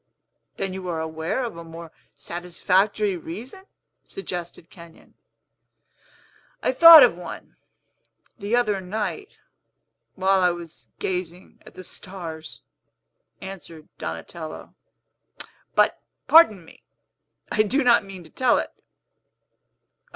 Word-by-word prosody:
"Then 195 -1 -3
you 190 -1 -7
are 165 -2 -3
aware 160 +9 -3
of 235 -7 -5
a 170 - -9
more 165 0 -11 0.2
satisfactory 185 +4 0
reason?" 225 - -9 0.4
suggested 175 - -7
Kenyon. 170 -1 -16 1.5
"I - - +2
thought 330 +4 +10
of - - +4
one, - - -10 0.8
the 205 +4 -2
other 210 -5 +1
night, 215 - -5 0.8
while 190 0 +2
I 180 - +4
was 165 -10 -8
gazing 180 -1 -5
at - - -15
the 185 - -10
stars," 170 -4 -9 0.8
answered 180 -5 -10
Donatello; 155 - -7 1.0
"but, - - +2 0.3
pardon 220 - +6
me, - - -18 0.7
I 215 - +3
do 265 +7 +1
not 240 -3 +5
mean 195 -2 -11
to 160 - -17
tell 255 -2 +2
it. - - -4
185 Hz, 110 wpm, -23 LUFS, 170-210 Hz, 1.5 s, thought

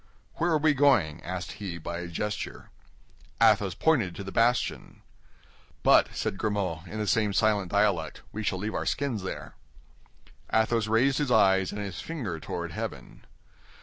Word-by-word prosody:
"Where 170 - +1
are 160 - +3
we 155 0 +3
going?" 125 - +3
asked 90 0 -5
he, 100 -5 -6
by 85 +1 -5
a 90 - -5
gesture. 105 +5 -5 0.7
Athos 95 -4 +4
pointed 120 - +2
to 100 - -6
the 95 - -7
bastion. 115 +5 0 0.8
"But," - - +6
said 95 - -2
Grimaud, 95 -6 -2
in 110 - -7
the 105 - -1
same 105 0 +1
silent 100 -2 +2
dialect, - - +1
"we 105 - -5
shall 100 -3 -1
leave 105 +4 -3
our - - -2
skins 135 -7 -1
there." 95 - -6 1.0
Athos 110 0 +2
raised 125 +6 +3
his 145 -3 0
eyes 95 -5 +4
and 105 - -5
his 100 -3 -5
finger 115 - -4
toward 85 +2 -5
heaven. - - -7
105 Hz, 160 wpm, -28 LUFS, 90-115 Hz, 1.0 s, But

